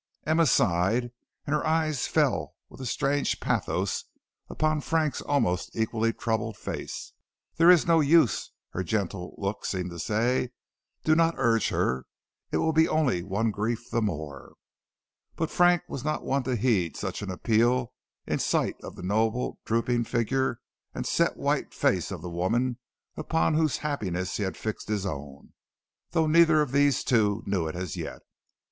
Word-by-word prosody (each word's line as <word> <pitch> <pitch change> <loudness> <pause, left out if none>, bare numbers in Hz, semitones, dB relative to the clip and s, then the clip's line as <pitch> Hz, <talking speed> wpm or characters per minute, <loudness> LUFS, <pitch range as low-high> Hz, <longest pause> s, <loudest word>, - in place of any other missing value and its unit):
Emma 160 +1 +3
sighed, 110 +4 +2 0.3
and 145 - -1
her 150 - +1
eyes 155 -4 +1
fell - - +1
with - - -12
a 130 - -4
strange 140 +4 0
pathos - - -1 0.4
upon 155 -1 0
Frank's 155 -1 0
almost 90 -11 0
equally 110 0 +1
troubled 110 0 -2
face. - - -6 0.4
"There 165 +1 +6
is 180 -3 +7
no 165 -1 +4
use," 150 - +3 0.2
her 95 - -3
gentle 95 -1 -3
looks 100 +1 -3
seemed 90 -2 -3
to 85 - -8
say. 120 +6 0 0.5
"Do 155 - +4
not 165 +1 +3
urge 115 -3 +2
her; 65 +1 -1 0.4
it - - +1
will 160 - +1
be 160 +1 +5
only 135 - +1
one 100 +5 -1
grief 115 +4 -3
the 115 - +1
more." 75 - -4 0.8
But 160 - -2
Frank 175 -1 +4
was 130 - -6
not 155 +1 -1
one 140 +1 +1
to 130 -1 0
heed 105 -8 +1
such - - -4
an 100 - -5
appeal 115 +6 +1 0.3
in - - -1
sight - - 0
of - - -9
the - - -9
noble 110 +5 0
drooping 115 +1 +1
figure 120 +2 0 0.3
and - - -3
set - - +1
white - - -1
face - - +1
of - - -6
the 90 - -5
woman 120 +9 0 0.4
upon 80 - +1
whose 155 -2 +2
happiness 95 -11 -2
he - - -4
had 95 -2 -2
fixed 110 -1 -5
his 105 -2 -1
own, 70 -5 -7 0.6
though 160 -1 +2
neither 160 0 +5
of 140 - -5
these 140 -1 +3
two 105 -4 +2
knew 95 -5 0
it 80 - -5
as 90 -2 -4
yet. - - -6
115 Hz, 165 wpm, -27 LUFS, 100-145 Hz, 0.8 s, is